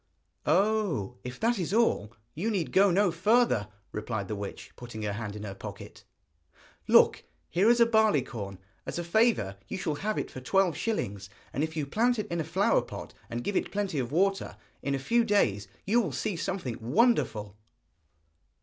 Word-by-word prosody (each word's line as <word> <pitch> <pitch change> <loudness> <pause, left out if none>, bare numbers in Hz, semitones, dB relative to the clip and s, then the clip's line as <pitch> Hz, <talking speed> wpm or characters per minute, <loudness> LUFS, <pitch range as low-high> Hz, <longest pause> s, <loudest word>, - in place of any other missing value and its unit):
'Oh, 195 - +1
if 125 +1 -7
that 230 -1 +1
is 185 +3 -1
all, 225 - +2 0.2
you 190 +9 -2
need 190 -7 -1
go 195 +1 +5
no 190 +1 +3
further,' 185 - +3 0.2
replied 105 -2 -3
the 105 - -2
witch, 100 -1 -7
putting 115 -3 -8
her 105 -1 -1
hand 105 -1 -5
in 105 - -7
her 100 -2 -5
pocket. 95 - -10 0.8
'Look, - - +5 0.3
here 195 +6 +4
is 240 0 +5
a 235 - +7
barley 220 - +3
corn, 100 -6 -7 0.3
as - - -4
a 175 - -2
favour 170 - +2
you - - -4
shall 160 -4 -1
have 215 +2 -1
it - - -3
for 130 - -8
twelve 185 +4 +2
shillings, 100 - -3 0.2
and 140 - 0
if 160 0 -3
you 150 - 0
plant 235 - +2
it 215 - -2
in 170 - -1
a - - -2
flower - - +2
pot, - - -8 0.2
and 120 +1 -4
give 205 - -2
it - - 0
plenty 200 -7 -1
of 125 -1 -3
water, 195 +5 +1 0.2
in 140 0 -1
a - - 0
few 235 - +2
days 125 - +2 0.2
you 230 +5 +3
will 185 -9 -2
see 175 - -2
something 165 -9 -3
wonderful.' 120 - +2
170 Hz, 190 wpm, -29 LUFS, -, 0.8 s, a